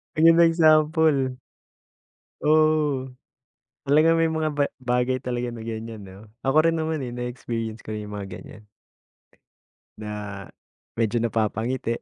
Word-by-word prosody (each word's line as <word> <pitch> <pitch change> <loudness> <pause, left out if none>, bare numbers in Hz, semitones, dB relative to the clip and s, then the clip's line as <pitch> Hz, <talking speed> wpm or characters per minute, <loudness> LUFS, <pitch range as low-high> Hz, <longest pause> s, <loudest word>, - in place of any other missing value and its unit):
Ayan, 165 +1 +6
ang 170 - +7
example. 155 -4 +3 1.1
Oo. 150 -4 +2 0.7
Talagang 160 +3 +4
may 165 - +3
mga 160 -1 -1
ba 145 -1 +1 0.2
bagay 125 +1 0
talaga 125 -1 -2
na 115 -1 -8
ganyan, 110 -2 -6
'no? 95 +3 -13 0.2
Ako 155 +5 +3
rin 165 - +2
naman, 160 -1 -2
eh, 125 -2 -5
na-experience 115 -2 -4
ko 110 - -7
rin 105 - -5
'yung 105 0 -8
mga 100 - -6
ganyan. 105 0 -14 1.3
Na 105 -2 -6 0.6
medyo 115 0 +1
napapangiti, 115 +2 -1
125 Hz, 130 wpm, -24 LUFS, 110-155 Hz, 1.3 s, ang